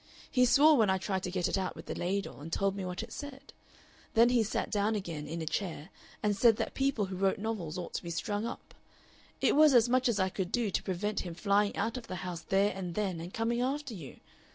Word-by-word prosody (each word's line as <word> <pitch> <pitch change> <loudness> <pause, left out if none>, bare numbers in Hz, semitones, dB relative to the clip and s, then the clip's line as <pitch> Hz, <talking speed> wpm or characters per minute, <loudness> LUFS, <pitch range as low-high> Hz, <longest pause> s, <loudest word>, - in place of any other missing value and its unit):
He 250 -1 +4
swore 295 +4 +6
when 220 -4 +4
I 190 - +3
tried 190 0 -2
to 180 - -3
get 180 -1 0
it - - 0
out 185 - -3
with - - -10
the - - -4
ladle, 195 -3 -3
and 160 +3 -8
told 195 +3 +1
me 195 - -4
what 180 +3 -4
it 230 - -9
said. 285 -1 -9 0.6
Then 230 +2 +6
he 245 -1 +3
sat 215 - -2
down 210 +1 +1
again 165 -7 -4
in 165 +2 -4
a - - -4
chair 160 0 -3 0.3
and 210 -1 +2
said 225 +2 +5
that - - -3
people 270 -6 +1
who 190 0 -6
wrote 190 +1 +1
novels 200 -7 -3
ought 175 -2 -6
to - - -2
be 170 - -7
strung 205 +5 -2
up. - - -8 0.7
It - - +3
was 300 -2 +6
as 235 -1 +6
much 255 +1 +3
as 215 -3 0
I 190 0 +2
could 185 -1 -3
do 230 -4 0
to - - 0
prevent 200 +3 -2
him 175 -2 -5
flying 200 +3 +2
out 225 +5 -1
of 235 -2 -8
the 185 - -5
house 175 -2 -4
there 200 +2 +2
and 180 -3 -5
then 195 -5 -1
and 175 +2 -7
coming 230 +2 0
after 275 0 -2
you. 160 -10 -9
200 Hz, 250 wpm, -31 LUFS, 180-230 Hz, 0.7 s, swore